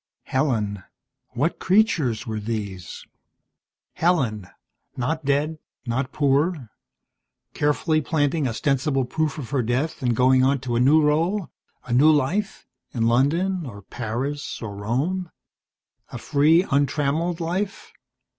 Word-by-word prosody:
Helen 110 -8 -1 0.5
what 140 +8 -1
creatures 155 - +2
were 110 -2 -3
these? 105 -5 -5 0.9
Helen 125 - 0 0.5
not 150 +5 -2
dead, 145 +3 0 0.3
not 130 +3 -2
poor, 145 - +1 0.8
carefully 155 +2 +1
planting 145 -1 0
ostensible 135 +2 0
proof 155 +3 -2
of 135 -5 -7
her 140 -3 +1
death 125 +7 -1
and 120 -2 +1
going 130 +2 +4
on 135 +1 +3
to 125 -3 -2
a - - +2
new 150 +5 +5
role, 165 +6 +1 0.3
a 120 - -3
new 140 +6 +6
life, 160 +8 0 0.3
in 115 -2 +1
London 165 +10 +1
or 100 -4 -10
Paris 125 +8 -4
or 105 -3 -6
Rome. 140 - -2 0.8
A - - -7
free, 155 +5 +3
untrammelled 150 +4 +1
life. 185 +4 -3
140 Hz, 120 wpm, -23 LUFS, 120-160 Hz, 0.9 s, new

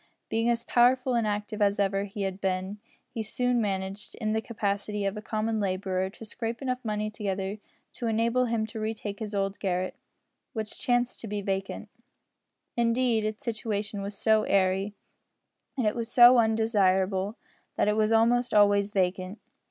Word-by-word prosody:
Being 225 +1 +1
as 235 -1 +1
powerful 250 +1 +3
and 230 -2 +1
active 210 +1 -3
as 200 0 +3
ever 195 0 +1
he 200 0 -5
had 195 0 -3
been, 190 +2 -2 0.3
he 230 - -3
soon 245 +2 0
managed, 195 -1 -3
in 215 -2 -2
the 220 - 0
capacity 205 -2 -2
of 195 +1 -1
a 210 - -5
common 220 +1 -1
labourer, 190 -1 -1
to 220 +3 -11
scrape 230 +1 -4
enough 255 -1 -3
money 215 -1 -2
together 195 -1 -3 0.3
to 235 - -4
enable 230 +3 +2
him 230 -2 0
to 220 +1 -7
retake 215 -2 -4
his 215 -2 -5
old 195 0 -1
garret, 185 -1 -1 0.6
which 215 -2 -4
chanced 245 0 0
to 225 - -6
be 205 -1 -3
vacant. 195 +2 -3 0.9
Indeed 235 -1 +2
its 215 0 -4
situation 215 -3 -3
was 200 0 -5
so 220 0 +4
airy, 195 +1 +1 0.8
and 250 - 0
it 210 - +1
was 235 -1 -3
so 245 0 +8
undesirable, 205 -3 +2 0.4
that - - +1
it 210 - +3
was 215 0 +2
almost 235 +1 +3
always 205 -1 +4
vacant. 185 0 -1
210 Hz, 170 wpm, -28 LUFS, 200-230 Hz, 0.9 s, so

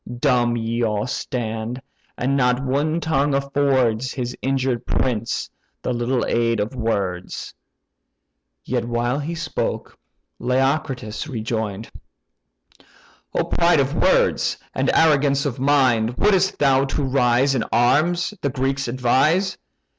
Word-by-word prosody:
Dumb 120 -3 +2
ye 115 +1 -2
all 105 -2 0
stand, 115 -1 -4 0.4
and 135 +3 0
not 125 -2 +2
one 145 +5 0
tongue 145 -3 +1
affords 130 -4 +1
His 125 -2 -4
injured 130 -2 0
prince 120 -2 -1 0.4
the 125 - -1
little 120 +1 0
aid 115 -1 +1
of 105 +5 -2
words." 100 -7 -3 1.1
While 120 +1 -1
yet 145 - -5
he 170 - -3
spoke, 160 -2 -3 0.4
Leocritus 130 -2 -1
rejoined: 110 -3 -4 1.4
"O - - +2
pride 170 -2 +2
of 140 +1 +1
words, - - +2 0.2
and - - 0
arrogance 145 -3 +3
of 135 -2 -3
mind! 130 -5 +2
Would'st 190 -2 +2
thou 135 -1 +3
to 140 +2 -2
rise 130 0 +2
in 125 -4 0
arms 155 - +2
the 140 - 0
Greeks 135 +1 -1
advise? 135 +10 +2
130 Hz, 120 wpm, -21 LUFS, 120-140 Hz, 1.4 s, arrogance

